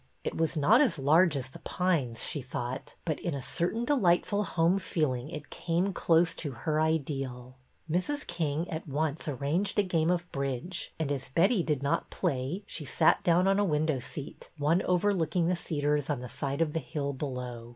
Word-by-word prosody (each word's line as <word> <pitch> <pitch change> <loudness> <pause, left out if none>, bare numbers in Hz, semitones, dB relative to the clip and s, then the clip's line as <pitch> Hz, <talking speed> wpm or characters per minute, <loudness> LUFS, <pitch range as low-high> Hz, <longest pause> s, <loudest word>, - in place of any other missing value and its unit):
It - - -3
was 165 0 0
not 205 - +5
as 265 - +3
large 155 +4 +4
as 130 -1 -4
The - - -11
Pines, 155 -11 -1
she 150 - -3
thought, 125 0 -5
but 155 -3 -1
in 170 -4 -2
a 140 - -4
cer 170 +6 0
tain 230 +2 -2
delightful 205 -5 +2
home 180 0 +2
feeling 145 -7 -1
it 150 -2 -8
came 175 +3 0
close 170 0 +3
to 145 -4 -4
her 155 -1 +2
ideal. 135 -5 -2 0.3
Mrs. 185 - -1
King 165 -1 -1
at 160 +1 -4
once 150 +2 -1
arranged 150 - -1
a 205 - +5
game 170 -4 +1
of 175 -1 +1
bridge, 140 +5 -3
and, 155 -3 -1
as 135 -2 -3
Betty 185 - +3
did 150 -4 -1
not 140 - 0
play, 135 +9 -2
she 155 - -4
sat 145 - +3
down 175 +2 +4
on 195 +1 +3
a - - +4
window 155 -5 +1
seat, 140 +3 -8
one 155 +5 +2
overlooking 180 -2 +2
the 180 - +2
cedars 150 -3 -1
on 145 -4 0
the 125 - -6
side 140 +2 -3
of 150 -2 -3
the 165 - 0
hill 140 +1 -3
below. 125 -4 -5
155 Hz, 195 wpm, -29 LUFS, 140-175 Hz, 0.3 s, not